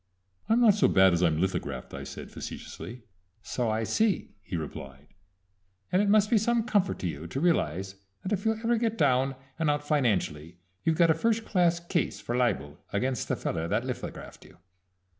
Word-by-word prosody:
"I'm 230 +2 +4
not 225 -4 +7
so 205 - +3
bad 95 -1 +5
as 85 - +1
I'm 80 -3 +3
lithographed," 95 +2 -2
I - - -6
said - - -8
facetiously. 120 0 -8 0.4
"So 120 +1 -1
I 110 +1 0
see," 215 - 0
he 95 - -6
replied, 70 -2 -8 0.8
"and 185 - +4
it 205 - +1
must 210 0 +4
be 225 - +5
some 235 +2 +1
comfort 205 -5 +1
to 90 - -1
you 80 0 -5
to 130 - -4
realize 95 - 0 0.3
that 195 - -2
if 200 -1 -1
you 220 - +2
ever 230 +2 0
get 225 -1 0
down 135 -2 +2 0.2
and 160 -2 +2
out 145 0 -1
financially 90 - 0 0.3
you've 160 -1 +1
got 170 -2 +5
a - - +5
first 225 +6 0
class 175 -3 +2
case 170 -1 -1
for 120 - -3
libel 115 - 0
against 125 +3 -1
the - - 0
feller 80 0 -2
that - - 0
lithographed - - -6
you." - - -17
145 Hz, 190 wpm, -28 LUFS, -, 0.8 s, not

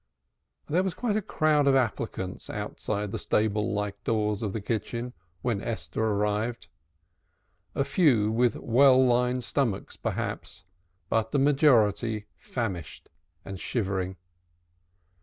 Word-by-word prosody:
There 170 +5 +2
was 190 -3 -2
quite 230 -4 -1
a 215 - +1
crowd 155 -5 +2
of 135 - +5
applicants 110 -6 -2
outside 105 0 -3
the 110 - -3
stable 105 +1 +1
like 105 0 -3
doors 105 -2 0
of 105 -3 -2
the 110 - -3
kitchen 115 +3 -3 0.3
when 115 -5 0
Esther 110 -1 -3
arrived, 105 +2 -1 1.1
a 140 - +2
few 125 - +3
with 120 +1 +2
well 130 +2 +5
lined 125 0 +2
stomachs, 115 -6 -1
perhaps, 90 +1 -4 0.4
but 110 0 0
the - - +1
majority 120 -6 +3
famished 95 - -5 0.4
and 95 -1 -6
shivering. 95 -5 -2
115 Hz, 120 wpm, -27 LUFS, 105-130 Hz, 1.1 s, of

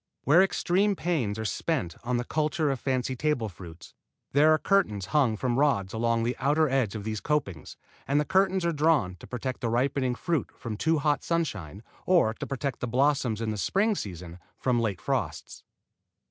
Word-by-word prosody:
Where 155 +7 +6
extreme 195 +1 +2
pains 140 - -1
are 110 - -4
spent 115 - -2
on 120 +1 0
the 120 - -1
culture 155 +2 0
of 135 - -3
fancy 130 0 -1
table 130 -5 -1
fruits 85 -2 -12 0.4
there 150 +3 +5
are 155 - +5
curtains 155 - +1
hung 130 -8 +3
from 125 +2 0
rods 100 -11 +1
along 115 0 +1
the 120 +2 -1
outer 150 +4 +2
edge 130 -6 0
of 105 - -5
these 110 -1 -4
copings, 115 - -2 0.3
and 140 +2 +2
the 150 - 0
curtains 190 0 +2
are 170 - +1
drawn 150 - +2
to - - -13
protect 130 +1 -5
ripening 125 +2 0
fruit 165 +1 -1
from 115 -3 -5
too 160 +9 +1
hot 145 0 0
sunshine, 105 - -3 0.2
or 170 -12 +4
to - - -7
protect 135 -1 -3
the 125 - -3
blossoms 125 -3 +1
in 110 -1 -1
the 105 - -4
spring 205 - +2
season 90 - -7 0.2
from 125 -2 +1
late 105 -6 -1
frosts. - - -3
130 Hz, 185 wpm, -27 LUFS, 110-155 Hz, 0.4 s, Where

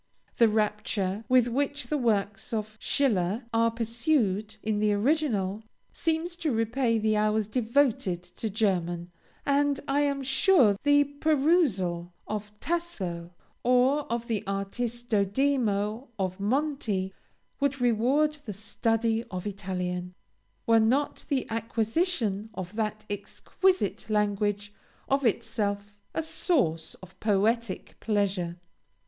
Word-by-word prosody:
The 230 -2 +6
rapture 210 -1 -1
with 250 -2 +5
which 280 +4 -1
the 300 - -1
works 210 -2 0
of 215 -1 -3
Schiller 215 -4 +1
are 230 0 +4
perused 230 - 0
in 215 -1 0
the 210 0 +3
original, 215 -5 +1 0.3
seems 330 +1 -1
to 320 -4 -1
repay 230 +1 +1
the 215 0 +1
hours 215 0 +2
devoted 225 -6 +1
to 180 +5 -5
German; 180 -5 -1 0.3
and 285 0 +2
I 275 +1 +2
am 280 -1 +1
sure 265 - +4
the 290 0 +5
perusal 280 - +1
of 210 0 -4
Tasso, 190 - -3 0.3
or 255 +3 +3
of 235 0 -2
the 220 -4 -1
Aristodemo 220 +2 0
of 185 -1 -2
Monti, 215 -5 -1 0.5
would 280 -1 0
reward 245 +6 +3
the 210 - -4
study 225 +3 0
of 185 0 -5
Italian, 180 -2 -4 0.5
were 230 0 +5
not 255 +7 +1
the 270 -3 +1
acquisition 225 - 0
of 185 +2 -6
that 215 -1 -2
exquisite 205 - -1
language 205 -1 0 0.3
of 275 -2 +2
itself 205 -2 -1 0.2
a 320 - 0
source 170 - 0
of 185 0 -14
poetic 215 0 0
pleasure. 195 -5 0
220 Hz, 115 wpm, -28 LUFS, 200-270 Hz, 0.5 s, The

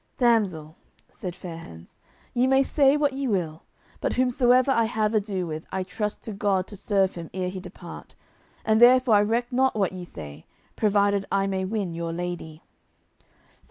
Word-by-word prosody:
"Damsel," 190 - +1 0.3
said 180 -2 -6
Fair 175 -3 -8
hands, 85 - -13 0.3
"ye 245 +1 +2
may 265 +1 +4
say 280 +1 +4
what 290 -2 +1
ye 270 0 -2
will, 170 -7 -1 0.4
but - - -1
whomsoever 255 +1 +3
I 230 -3 +3
have 220 -1 0
ado 200 -4 -1
with 155 -1 -6
I 190 - -2
trust 210 +2 -4
to 220 - -6
God 195 -2 0
to 205 - -8
serve 195 -1 +1
him 170 -2 -8
ere 185 -1 -1
he 190 0 -6
depart, - - -11 0.5
and 220 +1 +3
therefore 250 -1 +6
I - - +5
reck 235 +4 0
not 260 0 +2
what 195 -3 +1
ye 185 -1 -6
say, 75 - -10 0.3
provided 200 -1 +2
I 195 0 +2
may 190 -1 -1
win 195 -3 -2
your 165 0 -4
lady." 170 -2 -5
200 Hz, 175 wpm, -25 LUFS, 180-240 Hz, 0.5 s, therefore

